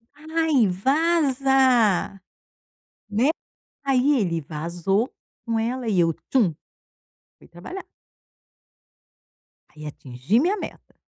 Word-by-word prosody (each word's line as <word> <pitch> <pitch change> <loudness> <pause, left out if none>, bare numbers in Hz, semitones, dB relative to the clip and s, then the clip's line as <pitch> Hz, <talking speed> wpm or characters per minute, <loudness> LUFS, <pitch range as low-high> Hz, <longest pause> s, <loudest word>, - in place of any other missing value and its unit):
"Ai, 315 -6 +1
vaza", 265 - +2 0.9
né? 230 +7 +2 0.6
Aí 270 0 +3
ele 170 -5 -1
vazou 170 - -2 0.3
com 230 -1 -1
ela 240 +1 -2
e 195 -5 +1
eu 165 -1 +3 0.2
tchum 215 - +2 0.8
fui - - -19
trabalhar. 355 - -9 1.8
Aí 150 0 -12
atingi 135 - -1
minha 365 +9 +1
meta. - - -9
235 Hz, 90 wpm, -23 LUFS, 175-275 Hz, 1.8 s, Aí